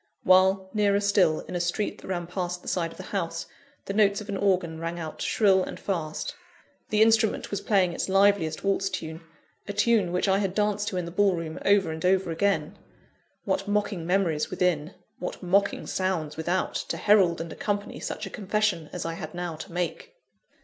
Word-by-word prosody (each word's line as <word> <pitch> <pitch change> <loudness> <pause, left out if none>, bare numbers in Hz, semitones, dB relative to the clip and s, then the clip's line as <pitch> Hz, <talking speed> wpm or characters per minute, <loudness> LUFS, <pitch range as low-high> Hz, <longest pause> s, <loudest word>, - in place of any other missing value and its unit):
While, 190 +1 +4
nearer 205 -2 +3
still, 200 -6 +3
in - - -9
a - - 0
street 175 +5 -2
that - - -11
ran 175 -2 -2
past 180 0 -4
the - - -13
side 170 -2 0
of - - -14
the - - -7
house, 170 -4 -2 0.4
the 195 - -3
notes 200 -1 +3
of 210 0 -9
an 200 - -2
organ 180 -5 +1
rang 165 +1 -4
out 160 -2 -6
shrill 195 -3 +3
and - - -7
fast; 165 -6 -3 0.6
the 215 0 +5
instrument 220 -1 +2
was 200 -1 -2
playing 190 -5 +2
its - - -3
liveliest 195 -5 +3
waltz 195 0 +1
tune 160 -3 -5 0.5
a 205 - -3
tune 210 -3 +2
which 180 +3 0
I 195 0 +3
had 195 -2 -1
danced 210 -1 +1
to 190 - -2
in 180 - -1
the 170 - -7
ball 195 +1 +3
room 165 -1 -5
over 195 -4 +4
and 160 0 -6
over 185 -1 +2
again. 200 +4 0 0.7
What 195 - -1
mocking 205 -4 -1
memories 175 -5 +1
within, 180 -3 0 0.2
what 180 - -5
mocking 200 +3 +1
sounds 175 -5 -2
without, 175 +4 -1
to - - -3
herald 195 -5 +4
and 165 -1 -5
accompany 205 0 -3
such - - -4
a 195 - -8
confession 200 -6 -1
as 180 - -5
I 165 - -2
had 165 -1 -7
now 175 -2 -3
to 165 +4 -9
make! 180 - -4
185 Hz, 200 wpm, -27 LUFS, 170-200 Hz, 0.7 s, the